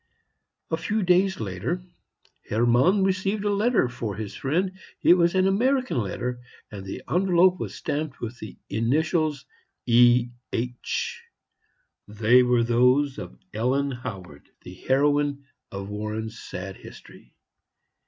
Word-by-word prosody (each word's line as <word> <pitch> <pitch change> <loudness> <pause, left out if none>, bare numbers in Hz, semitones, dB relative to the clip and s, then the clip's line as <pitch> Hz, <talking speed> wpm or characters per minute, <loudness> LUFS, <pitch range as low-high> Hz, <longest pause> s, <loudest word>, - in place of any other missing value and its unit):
A 160 - +1
few 210 +5 -1
days 185 +2 +3
later, 105 - -3 0.7
Hermann 120 - +3
received 195 +2 0
a 205 - +2
letter 215 - +2
for 120 -4 -5
his 105 -2 -6
friend. 170 - -1 0.3
It - - +7
was 170 0 +2
an 185 0 +3
American 255 - +1
letter, 120 +4 -3 0.3
and 100 -2 -7
the 95 - -7
envelope 180 0 +3
was - - -5
stamped 150 -2 -4
with 120 +1 -6
the 105 -4 -9
initials 150 - 0 0.4
"E. 120 0 +5 0.2
H." 465 - -3 0.9
They 110 +4 +4
were 125 -1 +3
those 125 +4 +2
of 60 - -9 0.2
Ellen 130 +6 0
Howard, 95 - -8
the 90 - -10
heroine 145 +5 +1 0.3
of 100 0 -6
Warren's 110 +2 -5
sad 95 +1 -7
history. - - -15
130 Hz, 125 wpm, -25 LUFS, 115-180 Hz, 0.9 s, It